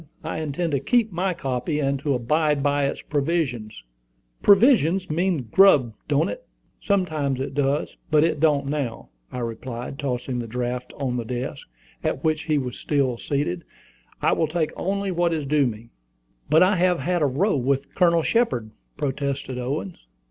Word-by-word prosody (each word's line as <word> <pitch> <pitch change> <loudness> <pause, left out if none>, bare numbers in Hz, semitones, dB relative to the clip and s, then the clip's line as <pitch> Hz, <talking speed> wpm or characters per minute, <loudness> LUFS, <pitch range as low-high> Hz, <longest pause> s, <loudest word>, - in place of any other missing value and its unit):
"I - - -3
intend 160 +2 -2
to 140 - +1
keep 225 - +2
my 180 +1 -1
copy, 135 0 -2
and 140 -1 0
to 140 0 0
abide 150 +4 +1
by 145 0 +2
its - - -5
provisions." 135 - -2 0.6
"Provisions 195 - +4
means 170 -2 0
grub, 145 - +6
don't 145 +2 +2
it?" - - -6 0.4
"Sometimes 155 - 0
it 135 - -3
does; 145 +1 0
but 155 -1 +4
it 160 -2 +1
don't 145 -3 +3
now," 140 -5 -3 0.2
I - - -6
replied, 120 +3 -5
tossing 125 -2 -2
the 120 - -4
draft 125 +2 -3
on 130 -3 -2
the 120 - -2
desk, 125 +4 -5 0.4
at 135 - -1
which 155 -1 0
he 155 -2 +1
was 130 -3 -3
still 135 -5 0
seated. 140 -12 -2 0.6
"I - - +4
will 160 - +1
take 155 0 -1
only 200 +1 -2
what 175 -1 +1
is 155 -3 -2
due 145 -1 +3
me." 115 0 -7 0.6
"But 160 +4 +6
I 190 +2 +3
have 180 0 +3
had 175 -1 0
a 145 - +4
row 155 +10 +1
with 135 +1 -1
Colonel 170 -3 +3
Shepard," 155 - +1 0.3
protested 140 -2 -2
Owen. 150 +9 -3
145 Hz, 170 wpm, -24 LUFS, 130-170 Hz, 0.6 s, grub